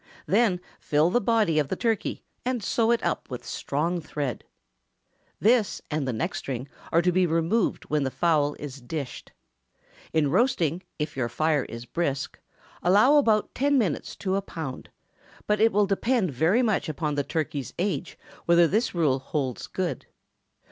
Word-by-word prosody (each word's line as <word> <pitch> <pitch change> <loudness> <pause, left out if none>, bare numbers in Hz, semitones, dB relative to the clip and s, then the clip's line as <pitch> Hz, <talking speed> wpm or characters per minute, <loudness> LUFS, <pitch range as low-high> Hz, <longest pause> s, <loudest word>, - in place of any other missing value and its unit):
Then 195 -3 +2 0.2
fill 155 +4 +2
the 245 - +3
body 210 -8 +2
of 145 - +1
the - - -2
turkey, 225 -3 -1 0.2
and 245 -3 -1
sew 225 +2 +1
it 235 0 +2
up - - -2
with 125 -2 -6
strong 165 +5 -2
thread. 145 -5 -4 1.0
This 225 -1 +3
and 150 -3 -1
the - - +1
neck 110 - -2
string 130 0 -4 0.2
are 170 +1 +4
to 180 - +3
be 180 0 +3
removed 165 +7 +1
when 150 0 0
the 135 - 0
fowl 150 -1 +1
is 140 -2 -8
dished. 135 +2 -6 0.8
In 150 -3 +2
roasting, 180 - +2 0.2
if 150 0 -3
your 125 -3 -1
fire 155 +3 +1
is 115 +1 -8
brisk, 140 -1 -2 0.4
allow 210 +11 +5
about 220 -7 +2
ten 280 +2 +2
minutes 195 - -1
to 190 -1 -1
a 200 - +1
pound; 160 -8 -7 0.6
but 210 0 +1
it 225 +1 +5
will 210 -1 +3
depend 200 - +1
very 165 - +2
much 215 -7 +1
upon 150 0 -2
the 145 0 0
turkey's 145 -2 -3
age 175 -6 -2 0.3
whether 170 0 +6
this 215 +3 0
rule 150 -6 +2
holds 135 -2 -3
good. 175 -8 -3
170 Hz, 165 wpm, -26 LUFS, 145-210 Hz, 1.0 s, whether